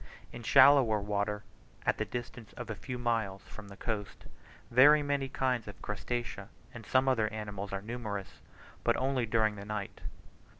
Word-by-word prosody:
In 120 Hz, -, -8 dB
shoaler 140 Hz, +4 st, +7 dB
water, 105 Hz, -1 st, -1 dB, 0.4 s
at -, -, +1 dB
the -, -, 0 dB
distance 120 Hz, -2 st, -7 dB
of -, -, -6 dB
a -, -, -3 dB
few 125 Hz, +4 st, -6 dB
miles 115 Hz, -5 st, -1 dB
from 105 Hz, -2 st, -11 dB
the 100 Hz, 0 st, -12 dB
coast, 105 Hz, -3 st, -4 dB, 0.5 s
very 145 Hz, +5 st, +7 dB
many 140 Hz, -2 st, -1 dB
kinds 125 Hz, -4 st, -1 dB
of 105 Hz, -, -9 dB
crustacea 120 Hz, +3 st, -4 dB, 0.2 s
and 115 Hz, -2 st, -10 dB
some 130 Hz, +1 st, +3 dB
other 115 Hz, -4 st, +2 dB
animals 105 Hz, -2 st, -5 dB
are 100 Hz, 0 st, -4 dB
numerous, 105 Hz, -4 st, -5 dB, 0.4 s
but 120 Hz, -, +2 dB
only 130 Hz, -2 st, 0 dB
during 110 Hz, -1 st, +2 dB
the 100 Hz, -, -7 dB
night. 105 Hz, -1 st, -5 dB
115 Hz, 165 wpm, -31 LUFS, 105-125 Hz, 0.5 s, shoaler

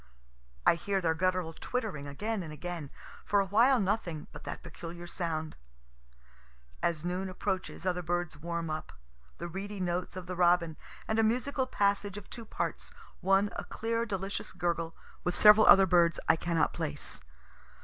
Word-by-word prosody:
I -, -, +7 dB
hear 195 Hz, +4 st, -1 dB
their 165 Hz, -3 st, +2 dB
guttural 180 Hz, -1 st, 0 dB
twittering 205 Hz, -, -3 dB
again 210 Hz, +9 st, -2 dB
and 160 Hz, -3 st, -6 dB
again; 160 Hz, -1 st, -5 dB, 0.3 s
for 205 Hz, -, +2 dB
awhile 230 Hz, +7 st, +4 dB
nothing 185 Hz, -6 st, -1 dB
but -, -, -11 dB
that -, -, -6 dB
peculiar 170 Hz, +1 st, -8 dB
sound. 160 Hz, -3 st, -3 dB, 1.3 s
As 165 Hz, -1 st, 0 dB
noon 185 Hz, +2 st, -2 dB
approaches 185 Hz, -1 st, -3 dB
other 180 Hz, -1 st, +1 dB
birds 175 Hz, -1 st, -1 dB
warm 165 Hz, +1 st, -3 dB
up. 155 Hz, 0 st, -5 dB, 0.4 s
The -, -, -5 dB
reedy 195 Hz, +3 st, -5 dB
notes 180 Hz, 0 st, -2 dB
of 185 Hz, -1 st, -6 dB
the 180 Hz, 0 st, -5 dB
robin, 175 Hz, -2 st, +3 dB, 0.3 s
and 220 Hz, +1 st, +1 dB
a -, -, +5 dB
musical 255 Hz, +4 st, +1 dB
passage 200 Hz, -3 st, +1 dB
of 205 Hz, -, -10 dB
two 230 Hz, -2 st, -7 dB
parts, 345 Hz, -, -4 dB, 0.2 s
one 195 Hz, +2 st, +3 dB
a -, -, -3 dB
clear 230 Hz, +1 st, -2 dB
delicious 195 Hz, -1 st, -3 dB
gurgle, 170 Hz, -2 st, -1 dB, 0.3 s
with 180 Hz, -, 0 dB
several 210 Hz, 0 st, +8 dB
other 195 Hz, 0 st, +9 dB
birds 170 Hz, -2 st, +4 dB
I -, -, +6 dB
cannot 165 Hz, -2 st, +1 dB
place. 150 Hz, -3 st, -4 dB
180 Hz, 160 wpm, -31 LUFS, 170-205 Hz, 1.3 s, other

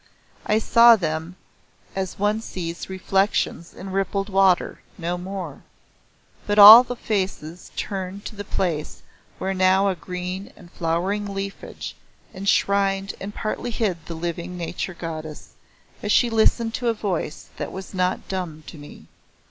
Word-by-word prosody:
I 215 Hz, -, +3 dB
saw 235 Hz, +1 st, +7 dB
them 165 Hz, -2 st, -3 dB, 0.6 s
as 190 Hz, -1 st, -3 dB
one 210 Hz, +2 st, +1 dB
sees 170 Hz, -5 st, -6 dB
reflections 190 Hz, -2 st, 0 dB
in 190 Hz, 0 st, -8 dB
rippled 195 Hz, +1 st, -1 dB
water 190 Hz, -2 st, +2 dB, 0.2 s
no 175 Hz, 0 st, -2 dB
more. 180 Hz, -4 st, -6 dB, 0.9 s
But 205 Hz, 0 st, 0 dB
all 215 Hz, +4 st, +12 dB
faces 195 Hz, -8 st, -4 dB
turned 195 Hz, 0 st, -5 dB
to 220 Hz, -, -7 dB
the 205 Hz, -, -6 dB
place 165 Hz, -6 st, -3 dB, 0.3 s
where 190 Hz, +1 st, -2 dB
now 190 Hz, +1 st, +3 dB
a 190 Hz, -, -1 dB
green 180 Hz, +2 st, -6 dB
and 175 Hz, -1 st, -16 dB
flowering 190 Hz, +5 st, -1 dB
leafage 195 Hz, 0 st, -6 dB, 0.4 s
enshrined 195 Hz, 0 st, +1 dB
and 195 Hz, -, -5 dB
partly 220 Hz, +3 st, -3 dB
hid 200 Hz, -8 st, -2 dB
the 165 Hz, -, -5 dB
living 170 Hz, +2 st, -4 dB
Nature 175 Hz, +1 st, -4 dB
Goddess, 155 Hz, -2 st, -7 dB, 0.5 s
as 210 Hz, -, -2 dB
she 240 Hz, +2 st, +4 dB
listened 225 Hz, +1 st, +2 dB
to 245 Hz, -, -2 dB
a 230 Hz, -, +2 dB
voice 185 Hz, -7 st, -4 dB
that -, -, -4 dB
was 190 Hz, +1 st, -8 dB
not 185 Hz, 0 st, -1 dB
dumb 175 Hz, -5 st, -5 dB
to 155 Hz, -, -11 dB
me. 145 Hz, -, -12 dB
190 Hz, 140 wpm, -23 LUFS, 175-205 Hz, 0.9 s, all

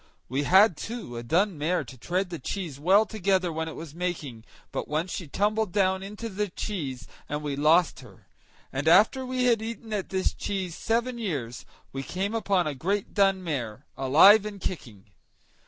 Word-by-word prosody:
We 135 Hz, +3 st, -1 dB
had, 190 Hz, 0 st, +6 dB
too, 225 Hz, -, -6 dB
a 120 Hz, -, -4 dB
dun 170 Hz, -, +1 dB
mare 170 Hz, +5 st, 0 dB
to 130 Hz, -, -11 dB
tread 180 Hz, +8 st, -2 dB
the 170 Hz, -, -5 dB
cheese 165 Hz, -2 st, -5 dB
well 195 Hz, +8 st, +5 dB
together 190 Hz, -4 st, 0 dB
when 160 Hz, 0 st, -3 dB
it 160 Hz, -, -7 dB
was 160 Hz, -3 st, -8 dB
making; 155 Hz, -10 st, -4 dB, 0.3 s
but -, -, -4 dB
once 160 Hz, +4 st, -2 dB
she 175 Hz, -, -5 dB
tumbled 210 Hz, +5 st, 0 dB
down 190 Hz, -1 st, +2 dB
into 210 Hz, +4 st, -6 dB
the 210 Hz, -1 st, -3 dB
cheese, 145 Hz, -, -5 dB, 0.2 s
and 150 Hz, +1 st, -3 dB
we 145 Hz, -2 st, -2 dB
lost 160 Hz, +4 st, +3 dB
her; 115 Hz, -7 st, -15 dB, 0.5 s
and 145 Hz, +3 st, -2 dB
after 215 Hz, +10 st, +5 dB
we 255 Hz, 0 st, -1 dB
had 235 Hz, -3 st, +3 dB
eaten 225 Hz, 0 st, -6 dB
at 200 Hz, -3 st, -2 dB
this 190 Hz, -1 st, 0 dB
cheese 190 Hz, -4 st, -3 dB
seven 235 Hz, +2 st, -1 dB
years, 140 Hz, -, -4 dB, 0.3 s
we 135 Hz, -, -3 dB
came 190 Hz, +9 st, -3 dB
upon 200 Hz, -5 st, +1 dB
a 150 Hz, -, -2 dB
great 190 Hz, +9 st, -2 dB
dun 195 Hz, -2 st, +3 dB
mare, 130 Hz, -6 st, -4 dB
alive 165 Hz, +11 st, +7 dB
and 210 Hz, -1 st, -6 dB
kicking. 115 Hz, -, -6 dB
180 Hz, 185 wpm, -27 LUFS, 150-205 Hz, 0.5 s, alive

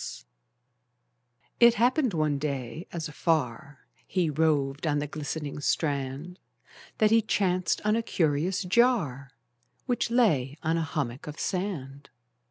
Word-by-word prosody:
It 235 Hz, -1 st, +7 dB
happened 245 Hz, -, +2 dB
one 150 Hz, -3 st, +1 dB
day, 140 Hz, +1 st, -4 dB
as 165 Hz, -2 st, -4 dB
afar 145 Hz, -3 st, -2 dB, 0.2 s
He 175 Hz, -4 st, 0 dB
roved 145 Hz, -1 st, +1 dB
on 145 Hz, -1 st, +1 dB
the 145 Hz, -, -1 dB
glistening 150 Hz, 0 st, -5 dB
strand, 145 Hz, +3 st, -2 dB, 0.6 s
That 215 Hz, -1 st, +3 dB
he 225 Hz, 0 st, +6 dB
chanced 185 Hz, -4 st, 0 dB
on 210 Hz, +1 st, +3 dB
a 230 Hz, -, +1 dB
curious 170 Hz, -2 st, 0 dB
jar, 180 Hz, -, +2 dB, 0.6 s
Which 245 Hz, -2 st, 0 dB
lay 155 Hz, -, +2 dB
on 160 Hz, +1 st, +1 dB
a 165 Hz, -, 0 dB
hummock 145 Hz, -5 st, -3 dB
of 150 Hz, +1 st, -7 dB
sand. 150 Hz, -8 st, -4 dB
160 Hz, 125 wpm, -27 LUFS, 140-190 Hz, 0.6 s, It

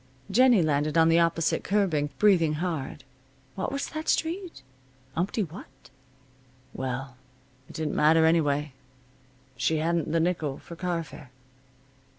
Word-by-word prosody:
Jennie 240 Hz, -3 st, +5 dB
landed 150 Hz, +1 st, 0 dB
on 165 Hz, 0 st, +5 dB
the 165 Hz, +1 st, +4 dB
opposite 165 Hz, -1 st, +1 dB
curbing, 180 Hz, -8 st, +1 dB
breathing 175 Hz, -7 st, +4 dB
hard. 155 Hz, -4 st, -4 dB, 0.5 s
What 190 Hz, -, -3 dB
was 275 Hz, +1 st, -3 dB
that 310 Hz, 0 st, -5 dB
street? 340 Hz, -, -2 dB, 0.5 s
Umpty 190 Hz, +5 st, 0 dB
what? 150 Hz, -6 st, -12 dB, 0.8 s
Well, 130 Hz, 0 st, -5 dB, 0.5 s
it -, -, -12 dB
didn't 155 Hz, -2 st, -2 dB
matter, 160 Hz, +2 st, +4 dB
anyway. 150 Hz, -3 st, +1 dB, 0.8 s
She 155 Hz, +5 st, +1 dB
hadn't 165 Hz, 0 st, 0 dB
the 165 Hz, -, +2 dB
nickel 160 Hz, -5 st, -1 dB
for 170 Hz, -, -11 dB
car 175 Hz, -1 st, -2 dB
fare. 145 Hz, -2 st, -13 dB
165 Hz, 130 wpm, -27 LUFS, 150-180 Hz, 0.8 s, Jennie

